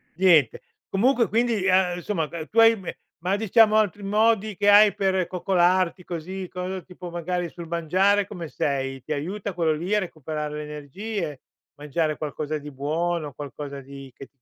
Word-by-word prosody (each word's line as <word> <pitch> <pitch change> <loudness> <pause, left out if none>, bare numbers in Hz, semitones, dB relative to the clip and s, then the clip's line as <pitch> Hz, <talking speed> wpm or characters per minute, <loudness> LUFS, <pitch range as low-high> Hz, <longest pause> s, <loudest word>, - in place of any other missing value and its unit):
Niente, 165 -8 +4 0.3
comunque 235 +4 +2
quindi, 230 -3 +1
ehm, 185 -2 +3
insomma, 170 -4 -2
ehm, 165 -2 -6
tu 230 - +1
hai 225 0 +7
me 190 -3 -7 0.3
ma, 190 +3 +1
diciamo 220 0 +4
altri 205 -1 +1
modi 215 0 +2
che 205 0 +3
hai 205 0 +7
per 190 -2 0
coccolarti, 180 0 +1
così, 180 +3 -6
cosa 185 +1 -4
tipo 180 0 -10
magari 175 0 -3
sul 170 -2 -9
mangiare, 185 +5 +2
come 170 -5 -7
sei? 135 -2 -2
Ti 155 +5 -4
aiuta 185 +7 -4
quello 165 -2 +1
lì 175 +7 -1
a 210 - +3
recuperare 155 -4 -5
le 150 - -4
energie? 150 - -5 0.4
Mangiare 150 +1 -2
qualcosa 155 0 -3
di 150 0 -8
buono, 155 +3 -2
qualcosa 140 0 -7
di 135 0 -11
che 135 - -11
175 Hz, 165 wpm, -24 LUFS, 150-195 Hz, 0.4 s, hai